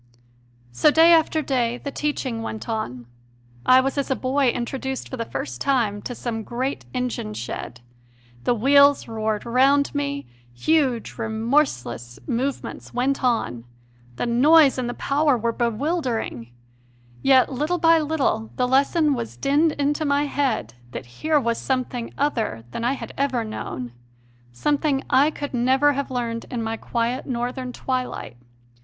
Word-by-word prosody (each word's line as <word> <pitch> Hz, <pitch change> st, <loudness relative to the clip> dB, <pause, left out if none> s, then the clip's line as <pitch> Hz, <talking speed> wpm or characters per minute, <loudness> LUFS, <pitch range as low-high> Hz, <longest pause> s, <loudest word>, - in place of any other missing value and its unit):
So 120 Hz, -, +4 dB
day 325 Hz, +3 st, +6 dB
after 315 Hz, -1 st, +3 dB
day 245 Hz, -3 st, 0 dB
the 280 Hz, -, -6 dB
teaching 270 Hz, -6 st, -2 dB
went 220 Hz, 0 st, -6 dB
on. 125 Hz, -, -4 dB, 0.6 s
I 255 Hz, 0 st, +7 dB
was 270 Hz, +2 st, -1 dB
as 280 Hz, -, -2 dB
a 265 Hz, -, +2 dB
boy 265 Hz, +2 st, +1 dB
introduced 265 Hz, +2 st, -3 dB
for -, -, -6 dB
the 230 Hz, -2 st, -3 dB
first 125 Hz, -, -5 dB
time 225 Hz, -7 st, +1 dB
to 245 Hz, -, -5 dB
some 230 Hz, -2 st, -4 dB
great 255 Hz, +5 st, -4 dB
engine 250 Hz, -, -3 dB
shed: 120 Hz, +1 st, -6 dB, 0.6 s
the 245 Hz, -, +2 dB
wheels 280 Hz, +4 st, +5 dB
roared 220 Hz, -1 st, -2 dB
round 270 Hz, +4 st, +3 dB
me; 280 Hz, -1 st, -2 dB, 0.3 s
huge, 260 Hz, -, 0 dB
remorseless 220 Hz, -, -1 dB
movements 260 Hz, +1 st, -3 dB
went 265 Hz, +3 st, 0 dB
on; 230 Hz, -, 0 dB, 0.5 s
the -, -, -2 dB
noise 275 Hz, +4 st, +5 dB
and 245 Hz, -1 st, -2 dB
the 245 Hz, -, -4 dB
power 285 Hz, -1 st, +2 dB
were 230 Hz, +1 st, 0 dB
bewildering; 235 Hz, -, -2 dB, 0.7 s
yet 265 Hz, 0 st, +4 dB
little 300 Hz, +7 st, 0 dB
by 330 Hz, -1 st, +5 dB
little 285 Hz, -8 st, 0 dB
the 250 Hz, -, +1 dB
lesson 285 Hz, +4 st, +3 dB
was 120 Hz, -, -5 dB
dinned 295 Hz, -, +2 dB
into 290 Hz, +2 st, 0 dB
my 285 Hz, -1 st, +2 dB
head 265 Hz, -, -1 dB, 0.2 s
that -, -, -6 dB, 0.2 s
here 310 Hz, -1 st, +3 dB
w^as 235 Hz, -3 st, 0 dB
something 255 Hz, -2 st, -2 dB
other 225 Hz, -, -1 dB
than 230 Hz, -, -4 dB
I 245 Hz, +3 st, +2 dB
had -, -, -7 dB
ever 260 Hz, -4 st, +1 dB
known, 125 Hz, -, -6 dB, 0.6 s
some 290 Hz, -, 0 dB
thing 280 Hz, -3 st, 0 dB
I 280 Hz, +3 st, +5 dB
could 290 Hz, -2 st, -6 dB
never 265 Hz, +4 st, +3 dB
have 280 Hz, 0 st, -3 dB
learned 235 Hz, -2 st, -3 dB
in 240 Hz, -3 st, -3 dB
my 225 Hz, 0 st, -2 dB
quiet 235 Hz, +3 st, -2 dB
Northern 250 Hz, 0 st, -3 dB
twilight. 255 Hz, -, -4 dB
255 Hz, 150 wpm, -23 LUFS, 230-280 Hz, 0.7 s, I